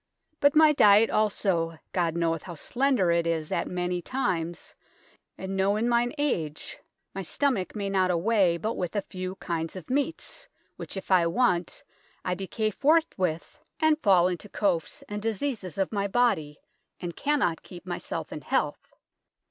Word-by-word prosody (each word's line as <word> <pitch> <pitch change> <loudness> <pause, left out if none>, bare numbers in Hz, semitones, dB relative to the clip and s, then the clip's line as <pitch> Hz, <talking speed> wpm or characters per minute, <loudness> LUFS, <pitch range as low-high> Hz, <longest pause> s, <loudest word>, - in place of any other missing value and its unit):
Butt 285 +1 +4
my 310 -1 +7
dyett 210 -4 +6
allso, 185 -6 +1
God 170 -3 0
knoweth 165 -2 0
how 175 - -6
slender 245 - +1
it 170 0 +1
is 160 -2 -1
at 170 - 0
meny 180 0 -2
tymes, 175 -8 -2 0.6
and 190 0 -5
noo 195 +1 +2
in 220 +3 0
myn 240 0 +2
age 165 - -2 0.3
my 195 - -4
sthomak 225 - 0
may 200 -2 -2
nott 190 -2 +2
awaye 180 0 +2
but 220 +5 -1
with 180 +2 -4
a 205 - 0
few 185 0 -6
kynd 165 -3 -4
of 185 +4 -8
meats, 325 - -2 0.3
which - - -7
if 190 - -7
I 175 -3 +5
want, 180 -2 0 0.4
I 180 - 0
decaye 205 +4 -2
forth 320 +6 +3
with, 170 -3 -2 0.2
and 315 -1 +3
fall 185 -4 +5
in 180 -2 -2
to 210 - -12
coafes 185 -7 -1
and 210 0 -5
diseases 220 - -3
of 195 - 0
my 200 -2 0
bodye, 195 -10 +1 0.4
and 175 -1 -5
kan 295 +1 +1
not 170 - 0
keep 180 0 -12
myself 175 -1 -5
in - - -6
health. - - -2
190 Hz, 170 wpm, -27 LUFS, 170-230 Hz, 0.6 s, my